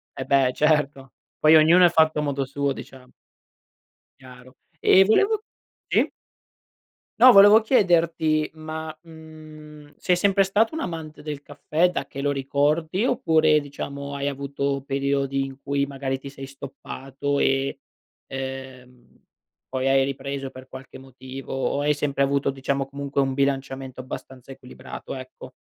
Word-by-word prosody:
Eh, -, -, -5 dB
beh, 135 Hz, -2 st, +3 dB
certo. 150 Hz, -3 st, 0 dB, 0.3 s
Poi 155 Hz, +1 st, +6 dB
ognuno 170 Hz, +4 st, +6 dB
è -, -, +6 dB
fatto 160 Hz, -2 st, +3 dB
a -, -, 0 dB
modo 140 Hz, -2 st, -2 dB
suo 140 Hz, +1 st, -2 dB
diciamo. 130 Hz, -1 st, -10 dB, 1.1 s
Chiaro. 130 Hz, 0 st, -15 dB, 0.3 s
Ehm, 190 Hz, +1 st, +6 dB
volevo 405 Hz, -, +2 dB, 0.5 s
sì -, -, +2 dB, 1.1 s
No, 255 Hz, +2 st, +9 dB
volevo 205 Hz, +1 st, +8 dB
chiederti 165 Hz, -, +2 dB
ma, 155 Hz, 0 st, -7 dB
mhmm, 155 Hz, -2 st, -13 dB
sei 180 Hz, -1 st, +1 dB
sempre 195 Hz, +1 st, +3 dB
stato 210 Hz, +6 st, +1 dB
un 320 Hz, -, -3 dB
amante 160 Hz, -3 st, -6 dB
del 150 Hz, -2 st, -6 dB
caffè, 155 Hz, +5 st, 0 dB
da -, -, -4 dB
che 140 Hz, -, -7 dB
lo 145 Hz, -, +1 dB
ricordi 150 Hz, -, 0 dB
oppure, 160 Hz, -8 st, +3 dB
diciamo, 140 Hz, 0 st, -7 dB
hai 140 Hz, 0 st, -2 dB
avuto 140 Hz, 0 st, -3 dB
periodi 140 Hz, 0 st, -1 dB
in 135 Hz, 0 st, -9 dB
cui, 140 Hz, 0 st, 0 dB
magari, 135 Hz, -1 st, -4 dB
ti 135 Hz, 0 st, -9 dB
sei 135 Hz, -1 st, -9 dB
stoppato 135 Hz, +1 st, -5 dB
e, 135 Hz, 0 st, 0 dB, 0.5 s
ehm, 130 Hz, -2 st, -9 dB, 0.5 s
poi 130 Hz, 0 st, -1 dB
hai 135 Hz, 0 st, +4 dB
ripreso 140 Hz, 0 st, -5 dB
per 130 Hz, 0 st, -13 dB
qualche 130 Hz, 0 st, -11 dB
motivo, 130 Hz, 0 st, -10 dB
o 135 Hz, +1 st, -1 dB
hai 150 Hz, +1 st, +2 dB
sempre 140 Hz, -1 st, -1 dB
avuto, 140 Hz, 0 st, +1 dB
diciamo, 135 Hz, 0 st, -2 dB
comunque 140 Hz, 0 st, -3 dB
un 135 Hz, -1 st, 0 dB
bilanciamento 135 Hz, -1 st, -2 dB
abbastanza 130 Hz, 0 st, -9 dB
equilibrato, 125 Hz, -1 st, -10 dB
ecco. 130 Hz, 0 st, -10 dB
140 Hz, 145 wpm, -24 LUFS, 135-155 Hz, 1.1 s, No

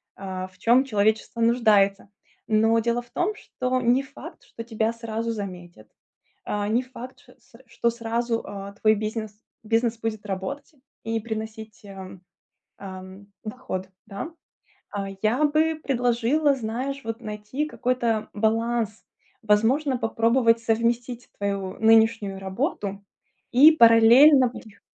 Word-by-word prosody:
а, 185 Hz, -1 st, -6 dB
в 185 Hz, 0 st, -23 dB
чём 240 Hz, +7 st, +4 dB
человечество 220 Hz, 0 st, 0 dB
нуждается. 210 Hz, -5 st, +3 dB, 0.4 s
Но 225 Hz, +1 st, +3 dB
дело 235 Hz, +1 st, 0 dB
в 240 Hz, -, -21 dB
том, 405 Hz, +4 st, -1 dB
что 255 Hz, -10 st, -3 dB
не 245 Hz, +2 st, +3 dB
факт, 275 Hz, +1 st, -12 dB
что 230 Hz, -, -9 dB
тебя 225 Hz, -1 st, -1 dB
сразу 230 Hz, 0 st, -4 dB
заметят, 180 Hz, -, -8 dB, 0.6 s
а, 205 Hz, 0 st, -2 dB
не 230 Hz, +3 st, +2 dB
факт 255 Hz, 0 st, -11 dB
ш 250 Hz, -3 st, -20 dB
c 230 Hz, -, -21 dB
что 235 Hz, 0 st, 0 dB
сразу, 230 Hz, 0 st, -2 dB
а, 200 Hz, 0 st, -7 dB
твой 215 Hz, +2 st, +2 dB
бизнес, 215 Hz, 0 st, -5 dB, 0.2 s
бизнес 225 Hz, +1 st, 0 dB
будет 220 Hz, -2 st, -4 dB
работать 210 Hz, -, -5 dB, 0.3 s
и 225 Hz, 0 st, -2 dB
приносить, 220 Hz, -1 st, -7 dB
ам, 190 Hz, -2 st, -10 dB, 0.6 s
ам, 190 Hz, 0 st, -10 dB, 0.2 s
доход, 210 Hz, -5 st, -6 dB, 0.2 s
да. 210 Hz, +10 st, -6 dB, 0.6 s
А, 200 Hz, -1 st, -4 dB
я 240 Hz, +7 st, +2 dB
бы 310 Hz, +1 st, +1 dB
предложила, 250 Hz, +3 st, +1 dB
знаешь, 260 Hz, +3 st, -4 dB
вот, 225 Hz, +1 st, -5 dB
найти 215 Hz, +6 st, -4 dB
какой-то 240 Hz, -6 st, -1 dB
баланс, 225 Hz, 0 st, -1 dB, 0.4 s
возможно, 245 Hz, +6 st, +2 dB
попробовать 230 Hz, +1 st, +2 dB
совместить 235 Hz, +2 st, -1 dB
твою 200 Hz, -2 st, -3 dB
нынешнюю 220 Hz, -3 st, +3 dB
работу 200 Hz, -, -3 dB, 0.5 s
и 285 Hz, +6 st, +8 dB
параллельно 250 Hz, +2 st, +7 dB
вых 215 Hz, -4 st, -13 dB
225 Hz, 130 wpm, -24 LUFS, 210-245 Hz, 0.6 s, и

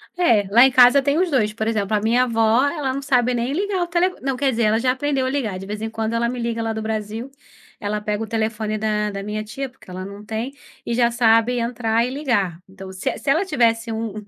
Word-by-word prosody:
É, 235 Hz, -, +3 dB
lá 235 Hz, +4 st, +7 dB
em 265 Hz, -, +3 dB
casa 255 Hz, +2 st, +7 dB
tem 280 Hz, +2 st, +1 dB
os 365 Hz, 0 st, +1 dB
dois. 215 Hz, -8 st, +1 dB
Por 220 Hz, 0 st, -3 dB
exemplo, 215 Hz, -2 st, 0 dB
a -, -, +2 dB
minha 235 Hz, +4 st, +3 dB
avó 225 Hz, 0 st, +2 dB
ela 285 Hz, -4 st, -2 dB
não 275 Hz, -, -4 dB
sabe 250 Hz, -3 st, +2 dB
nem 240 Hz, +2 st, -1 dB
ligar 385 Hz, +1 st, -1 dB
o -, -, -4 dB
tele 350 Hz, +2 st, +2 dB
não, 270 Hz, -1 st, -1 dB
quer 275 Hz, 0 st, +1 dB
dizer, 235 Hz, -1 st, 0 dB
ela 215 Hz, +1 st, +3 dB
já 255 Hz, +1 st, +2 dB
aprendeu 270 Hz, 0 st, -1 dB
a -, -, 0 dB
ligar, 250 Hz, -9 st, -2 dB
de 195 Hz, -, -8 dB
vez 210 Hz, +2 st, -6 dB
em 220 Hz, -, -3 dB
quando 225 Hz, 0 st, -3 dB
ela 235 Hz, 0 st, +1 dB
me 250 Hz, 0 st, -4 dB
liga, 235 Hz, -1 st, -2 dB
lá 225 Hz, 0 st, -2 dB
do 220 Hz, -, -4 dB
Brasil. 220 Hz, +3 st, -4 dB, 0.5 s
Ela 210 Hz, 0 st, -3 dB
pega 210 Hz, +1 st, -2 dB
o -, -, -6 dB
telefone 220 Hz, -1 st, -2 dB
da 210 Hz, -1 st, -1 dB
da 195 Hz, 0 st, -5 dB
minha 210 Hz, +1 st, -4 dB
tia, 265 Hz, +6 st, -6 dB
porque 255 Hz, -6 st, -20 dB
ela 185 Hz, +1 st, -6 dB
não 200 Hz, +2 st, -10 dB
tem, 225 Hz, +5 st, -4 dB, 0.3 s
e 235 Hz, -, -2 dB
já 235 Hz, 0 st, +2 dB
sabe 235 Hz, +1 st, +3 dB
entrar 230 Hz, -1 st, 0 dB
e 250 Hz, -, -3 dB
ligar. 235 Hz, -, -1 dB
Então, 190 Hz, 0 st, -10 dB
se 190 Hz, 0 st, -3 dB
e -, -, -4 dB
se -, -, -4 dB
ela 325 Hz, +8 st, +3 dB
tivesse 230 Hz, -7 st, +1 dB
um 220 Hz, -1 st, -3 dB
230 Hz, 260 wpm, -21 LUFS, 215-260 Hz, 0.5 s, lá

